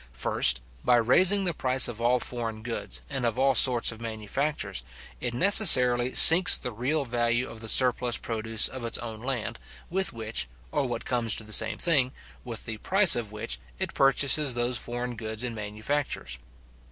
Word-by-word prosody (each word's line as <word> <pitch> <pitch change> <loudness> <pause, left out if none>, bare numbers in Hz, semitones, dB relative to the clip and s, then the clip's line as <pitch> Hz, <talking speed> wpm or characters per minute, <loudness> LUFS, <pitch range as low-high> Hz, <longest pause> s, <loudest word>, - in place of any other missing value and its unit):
First, - - +1 0.2
by 125 - +2
raising 185 - +2
the 175 -2 -1
price 130 -3 +1
of 115 -1 -9
all 125 +2 0
foreign 115 -3 -6
goods, 115 0 -6
and 135 -3 -5
of 120 0 -3
all 135 +1 +1
sorts 120 -1 +4
of 115 0 -13
manufactures, 110 0 -5 0.4
it 120 -1 -5
necessarily 125 - +5
sinks 180 +2 +9
the 125 - -8
real 135 +7 -3
value 120 +1 -2
of 110 - -13
the 115 - -3
surplus 125 -1 +2
produce 110 -1 -2
of 130 -2 -10
its 115 - -1
own 110 -2 -9
land, 125 -3 -5 0.3
with 190 +1 -1
which, 110 - -5 0.2
or, - - -3
what - - -7
comes 115 -3 -1
to - - -5
the 110 0 -6
same - - +1
thing, 140 -6 0 0.3
with 115 -3 -7
the 110 -1 -7
price 190 - +2
of 115 -4 -6
which, 105 - -6 0.2
it - - -5
purchases 135 0 +2
those 120 +1 -2
foreign 120 0 -7
goods 110 0 -6
and 120 -2 -5
manufactures. 105 - -6
120 Hz, 175 wpm, -25 LUFS, 110-135 Hz, 0.4 s, sinks